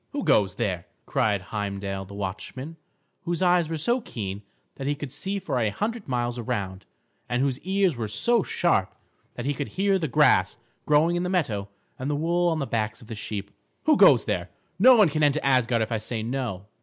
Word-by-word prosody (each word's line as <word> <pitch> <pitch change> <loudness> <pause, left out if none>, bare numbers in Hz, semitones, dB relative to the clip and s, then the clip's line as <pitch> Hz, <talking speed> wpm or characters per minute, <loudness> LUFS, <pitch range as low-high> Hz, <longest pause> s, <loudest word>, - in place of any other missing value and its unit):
"Who 285 -2 -2
goes 95 -3 +3
there!" 95 -6 -2 0.2
cried 105 -3 +1
Heimdal 100 -2 -3
the 100 +1 -11
watchman, 105 - -6 0.5
whose 175 +2 -2
eyes 175 -3 +3
were 165 - -2
so 240 - +1
keen 100 - -5 0.4
that 135 - -4
he 145 - +1
could 145 -2 -7
see 195 +8 -3
for 185 -10 -2
a 110 -3 +2
hundred 215 - -3
miles 120 -1 -1
around, 100 -4 -4 0.4
and 120 - 0
whose 135 -1 0
ears 190 -3 +1
were 115 -2 -3
so 230 - +2
sharp - - 0 0.4
that 120 - -5
he 145 - +1
could 145 0 -4
hear 195 0 +3
the 160 - -1
grass 125 -10 +3 0.3
growing 155 +4 +4
in - - 0
the 180 - -1
meadow 110 - -1 0.3
and 130 +2 -3
the 145 - 0
wool 170 +3 +1
on 165 - 0
the 140 - -1
backs 110 0 -2
of 110 - -16
the - - -4
sheep. 105 -1 -5 0.3
"Who 310 -1 +5
goes 140 - +6
there! 90 -4 -2 0.3
No 255 +5 +8
one 210 -5 +6
can 155 +1 -1
enter 145 0 +3
Asgard 125 -4 +3
if 110 - -6
I 110 - 0
say 110 +1 -4
no." 115 -6 -3
130 Hz, 205 wpm, -26 LUFS, 105-170 Hz, 0.5 s, No